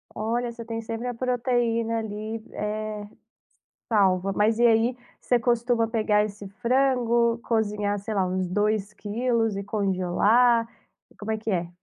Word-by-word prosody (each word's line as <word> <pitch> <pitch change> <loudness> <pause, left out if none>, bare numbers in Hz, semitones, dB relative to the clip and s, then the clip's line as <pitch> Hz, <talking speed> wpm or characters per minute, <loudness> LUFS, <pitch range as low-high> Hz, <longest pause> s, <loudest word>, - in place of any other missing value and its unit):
Olha, 235 +2 -1
você 230 -1 -9
tem 225 0 -4
sempre 225 +2 -5
a 245 - -2
proteína 235 -2 0
ali, 220 +1 -5
eh, 210 0 -4 0.8
salva. 195 -3 +2
Mas 215 +3 +2
e 240 - +5
aí, 230 +2 +3 0.2
você 245 - +2
costuma 240 0 +1
pegar 215 -2 +2
esse 205 -1 -7
frango, 235 +1 +2
cozinhar 210 -2 0
sei 215 +2 -5
lá 190 -2 +1
uns 185 0 -1
2 210 +2 0
quilos 225 0 -1
e 200 - -3
congelar? 205 +4 +2 0.4
E - - -23
como 210 +1 -6
é 220 - -1
que 220 +1 -4
é? 175 -3 -1
220 Hz, 150 wpm, -25 LUFS, 205-235 Hz, 0.8 s, e